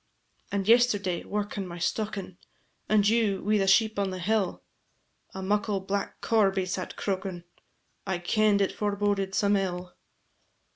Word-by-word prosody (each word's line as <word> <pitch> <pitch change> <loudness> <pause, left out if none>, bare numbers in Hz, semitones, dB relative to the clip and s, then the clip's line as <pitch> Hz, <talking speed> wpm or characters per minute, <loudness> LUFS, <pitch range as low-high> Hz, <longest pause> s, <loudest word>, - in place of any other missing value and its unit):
"And 200 -1 -1
yesterday, 210 -6 +3
workin' 205 -1 -3
my 175 0 -7
stockin', 195 0 -3 0.5
And 210 -1 +4
you 215 -3 +2
wi' 210 +1 +2
the 195 - +1
sheep 220 +2 +4
on 200 -1 0
the 185 - -5
hill, 195 +1 -1 0.7
A 190 - -5
muckle 205 +1 0
black 195 +1 -4
corbie 195 -4 +2
sat 185 0 -4
croakin'; 190 -3 -3 0.6
I 190 - 0
kend 205 +3 +2
it 195 - +2
foreboded 200 -2 -1
some 205 0 +3
ill." 180 -2 -2
200 Hz, 140 wpm, -27 LUFS, 190-210 Hz, 0.7 s, And